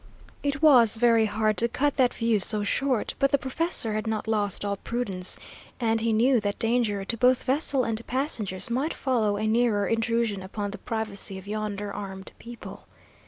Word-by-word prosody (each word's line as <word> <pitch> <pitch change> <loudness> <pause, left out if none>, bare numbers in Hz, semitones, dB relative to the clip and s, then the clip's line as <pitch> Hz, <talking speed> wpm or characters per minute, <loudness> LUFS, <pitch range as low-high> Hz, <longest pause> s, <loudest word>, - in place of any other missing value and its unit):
It 285 +1 -2
was 240 -8 +6
very 230 -1 +4
hard 215 0 0
to 235 - +4
cut 285 +4 -1
that 250 -2 +4
view 230 -2 0
so 210 +2 +1
short, 255 +3 0
but 275 - +3
the 280 - +3
professor 265 -4 0
had 215 +1 -3
not 220 0 -2
lost 205 -2 -1
all 200 0 -2
prudence, 195 -6 -3 0.4
and 225 -2 +1
he 230 0 +1
knew 240 +3 +3
that 205 -1 -3
danger 225 -4 0
to 230 - -1
both 250 +1 +3
vessel 275 -1 +1
and 225 -1 -2
passengers 230 -7 -1
might 270 +7 -1
follow 220 -7 0
a 215 - -2
nearer 220 -2 +2
intrusion 230 -2 0
upon 200 +2 -5
the 205 - -8
privacy 215 -4 -2
of 190 - -11
yonder 205 -1 -4
armed 190 -2 -7
people. 235 0 -11
225 Hz, 180 wpm, -26 LUFS, 205-245 Hz, 0.4 s, was